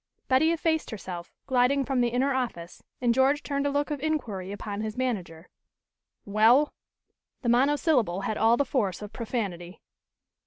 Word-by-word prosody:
Betty 265 +5 +4
effaced 325 -1 0
herself, 185 -5 -7
gliding 260 +2 +2
from 260 -1 0
the 240 - +3
inner 255 +4 +1
office, 220 -10 -4 0.2
and 240 -2 +3
George 270 +4 +2
turned 280 0 -1
a - - +1
look 290 +2 -1
of 295 - -2
inquiry 230 -11 -3
upon 205 0 -5
his 220 +1 -4
manager. 185 -10 -3 0.8
"Well?" 225 +8 +4 0.7
the 240 - +1
monosyllable 250 - +2
had 215 - -2
all 225 +2 +4
the 285 - +1
force 210 -8 -1
of 210 +1 -9
profanity. 195 -7 -4
245 Hz, 155 wpm, -27 LUFS, 205-280 Hz, 0.8 s, Betty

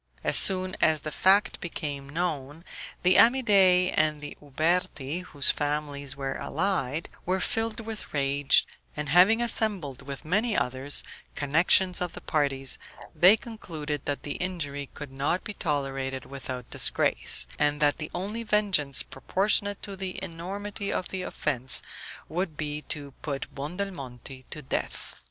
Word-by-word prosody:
As - - +3
soon 185 -1 +8
as 155 -2 +3
the 155 - -5
fact 195 +6 +3
became 145 -5 -5
known, 155 -1 -3 0.4
the 180 +1 +5
Amidei 195 -7 +5
and 155 -1 +2
the 145 0 -8
Uberti, 155 0 -1
whose 145 -6 +5
families 145 -2 -3
were 135 -1 -4
allied, 165 -6 -2 0.2
were 185 +2 0
filled 225 +2 -1
with 220 -1 -7
rage, 140 -1 +3 0.3
and 150 -1 -4
having 190 +9 +5
assembled 200 - -1
with 140 +1 -8
many 210 +7 +1
others, 130 +3 +1 0.3
connections 175 +5 +3
of 180 -1 -2
the - - -9
parties, 135 -3 -1 0.4
they 185 +5 +7
concluded 155 - -6
that 145 - -2
the 145 - -4
injury 145 -6 -4
could 145 -3 -8
not 140 +7 -1
be 210 - -6
tolerated 135 -5 -3
without 130 -3 -7
disgrace, - - +2
and 150 0 +1
that 145 0 +2
the 155 - -4
only 205 +6 -4
vengeance 200 - +1
proportionate 200 +6 -1
to 200 - -6
the 190 -1 -6
enormity 200 +5 -5
of 180 - -2
the 190 - -4
offence 135 -7 -1 0.4
would 165 -1 -3
be 150 -1 -4
to 145 -2 -4
put 140 -3 -5
Buondelmonti 140 - -6
to 150 - -8
death. 130 - -4
155 Hz, 140 wpm, -27 LUFS, 140-190 Hz, 0.4 s, soon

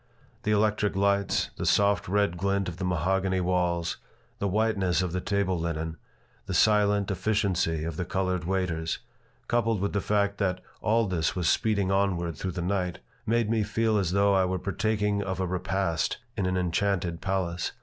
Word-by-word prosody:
The 110 - -2
electric 105 -1 +2
lights, 100 0 +1
the - - -3
soft 100 -1 +3
red 100 -1 +1
glint 100 +2 0
of 85 -2 -5
the 95 - -4
mahogany 95 +2 +1
walls, 90 -2 0 0.4
the 100 - 0
whiteness 100 -3 +1
of 90 - -2
the 90 +1 -2
table 95 -2 0
linen, 80 -1 -3 0.5
the - - -2
silent 105 -2 +3
efficiency 95 -5 0
of 80 -1 -4
the - - -1
colored 90 -1 -1
waiters, 85 -3 -1 0.5
coupled 115 -3 +1
with 100 +2 -1
the 100 - +1
fact 100 0 0
that 95 -2 0 0.2
all 115 +1 +2
this 90 -5 -1
was 90 -3 0
speeding 100 -4 +2
onward 90 -4 +1
through 90 +4 -4
the 90 - -3
night, 90 -1 -1 0.3
made 115 0 +2
me 110 0 +1
feel 110 +1 +1
as 95 -4 0
though 100 +1 +3
I 95 -1 +4
were 95 0 -1
partaking 105 +2 0
of 95 -2 -3
a 95 - +1
repast 90 -2 -1 0.2
in 95 -4 0
an 90 0 0
enchanted 90 -1 0
palace. 95 -3 -1
95 Hz, 175 wpm, -27 LUFS, 90-100 Hz, 0.5 s, I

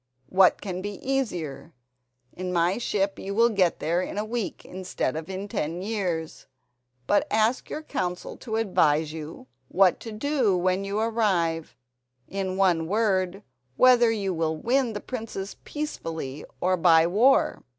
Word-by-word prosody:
What 185 -1 +4
can 185 -2 -4
be 205 +1 -5
easier? 175 - -2 0.6
In 185 0 -4
my 175 +4 +1
ship 200 -4 -1
you 200 +1 -5
will 230 +2 +5
get 190 -6 +2
there 170 +3 0
in 190 - -5
a 210 - -1
week 230 -1 -4
instead 185 -6 -3
of 160 +2 -5
in 190 +1 -5
ten 170 -1 -3
years. 180 -7 -3 0.6
But 205 - +2
ask 220 +4 +1
your 310 - -5
council 180 -12 -3
to 220 -3 -5
advise 160 -8 +2
you 155 -3 -8 0.2
what 190 +3 +3
to 225 - -8
do 235 -4 +1
when 185 +2 +1
you 200 +1 -3
arrive—in 165 - -2
one 175 -4 +2
word, 195 -2 0 0.3
whether 245 -2 +6
you 200 -4 -1
will 160 -1 -1
win 245 - +1
the 205 - -5
princess 220 -5 -6
peacefully 165 - -5
or 185 +1 +2
by 165 -2 +5
war?" 225 +10 +3
190 Hz, 150 wpm, -26 LUFS, 170-220 Hz, 0.6 s, whether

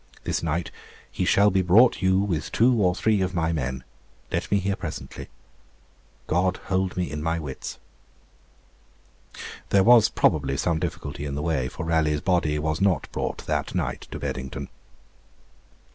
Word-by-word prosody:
This - - -1
night 80 +1 -2 0.4
he - - -2
shall 100 +1 +4
be 95 0 +2
brought 100 +8 +5
you 95 0 +3
with 90 -6 -2
two 125 +3 +4
or 90 -2 +3
three 105 0 +1
of 95 0 -1
my 85 -1 0
men. 65 -4 -3 0.5
Let - - -2
me 100 - +3
hear 100 0 -1
presently. - - -7 1.0
God 90 +2 +1
hold 95 -1 -1
me 90 -6 -1
in 75 +1 -4
my 80 +1 0
wits. 75 -5 -6 1.9
There 100 -1 +4
was 120 -1 +7
probably 70 -3 +1
some 80 +3 0
difficulty 80 -4 -5
in 70 -1 -4
the 75 - -3
way, 75 -6 0
for 80 - -6
Raleigh's 80 -2 +1
body 85 -5 +1
was 80 +2 -2
not 95 -3 +1
brought - - -4
that - - -2
night - - -3
to - - -6
Beddington. 65 +1 -5
85 Hz, 160 wpm, -25 LUFS, 75-95 Hz, 1.9 s, was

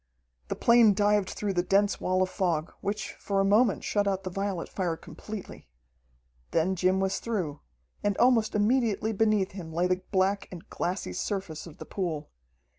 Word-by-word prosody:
The - - -2
plane 235 -3 +5
dived 205 -1 +2
through 205 -2 -2
the 175 - +2
dense 200 +3 +2
wall 185 0 +2
of 185 - -2
fog, 170 -4 -1
which 210 +1 -3
for 200 -1 -1
a 195 - +3
moment 215 +5 +3
shut 205 -1 +1
out 195 -1 0
the 185 - -4
violet 195 -2 -2
fire 175 -4 -2
completely. 210 - -9 0.8
Then 175 +4 +1
Jim 185 +1 +2
was 190 0 0
through, 180 -11 -3 0.4
and 205 -1 +1
almost 235 -4 +3
immediately 220 0 +2
beneath 210 -2 +2
him 175 -4 -8
lay 170 +2 +1
the 180 0 +1
black 195 0 +1
and 175 -3 -10
glassy 175 - -2
surface 175 - -4
of 160 - -12
the - - -8
pool. 165 -6 -4
195 Hz, 175 wpm, -28 LUFS, 180-205 Hz, 0.8 s, plane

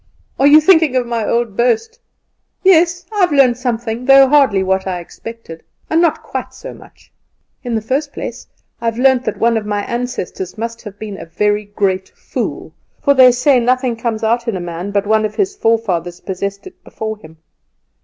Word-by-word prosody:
"Are 275 - +5
you 300 +2 +8
thinking 320 -4 +4
of 250 -1 +1
my 235 -2 -2
old 235 -3 -1
boast? 250 - 0 0.6
Yes; 355 -1 +3
I - - -1
have 360 -3 +3
learnt 270 -4 +4
something, 240 -1 -3
though 270 0 +7
hardly 260 -9 +3
what 190 0 0
I 185 -1 -2
expected, 175 -1 -10 0.3
and 325 +1 +3
not 340 -2 +1
quite - - -6
so - - -9
much. - - -18 0.5
In 245 -2 -3
the 220 - -1
first 280 +5 -2
place, - - -7 0.3
I - - -5
have 230 0 -1
learnt 260 0 +3
that 215 - -2
one 230 0 +2
of 215 - -4
my 205 -1 -1
ancestors 235 -6 -5
must 230 +1 -5
have 205 -3 -10
been 210 -2 -7
a - - -8
very 210 +4 0
great 195 -2 -2
fool; - - -5 0.3
for 280 - +3
they 260 -2 +7
say 250 +2 +3
nothing 250 0 +1
comes 225 -1 -3
out 235 +2 0
in 220 -5 -1
a - - -5
man 175 +2 -5
but 200 0 -1
one 215 +1 +2
of 215 -1 -3
his 395 0 -1
forefathers 190 - -1
possessed 200 +1 -5
it - - -14
before 220 0 -6
him. 160 -5 -16
230 Hz, 195 wpm, -16 LUFS, 205-260 Hz, 0.6 s, you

